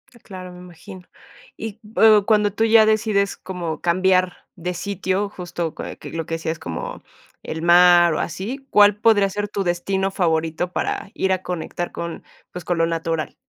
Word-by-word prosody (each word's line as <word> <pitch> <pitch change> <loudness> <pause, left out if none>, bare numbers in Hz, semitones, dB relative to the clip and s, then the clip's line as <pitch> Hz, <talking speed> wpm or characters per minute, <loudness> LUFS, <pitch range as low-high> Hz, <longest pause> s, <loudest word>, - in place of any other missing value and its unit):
Ah, - - -17
claro, 185 -2 -9
me 180 - -12
imagino. 180 +2 -12 0.6
Y 220 -1 -7 0.2
o 215 -2 +6
cuando 210 -1 +3
tú 220 - 0
ya 225 -1 +6
decides 215 -2 +1
como 175 -4 -6
cambiar 185 +1 +2 0.2
de 180 0 -4
sitio, 195 +2 -2
justo 175 -4 -5
que - - -7
que - - -10
lo 165 -1 -4
que 165 - -3
decías 165 0 -4
como 80 -2 -6 0.4
el 160 - -5
mar 175 0 +6
o - - -2
así, 225 - -5
¿cuál 205 -1 +6
podría 205 -2 +3
ser 205 +1 -4
tu 200 -1 -2
destino 190 +2 -1
favorito 165 -1 -1
para 195 - -3
ir 190 - -1
a 185 - -2
conectar 175 0 -4
con, 170 0 -6 0.3
pues, 180 - -8
con 175 - -1
lo 165 - +3
natural? 165 -1 -3
180 Hz, 180 wpm, -21 LUFS, 170-205 Hz, 0.6 s, o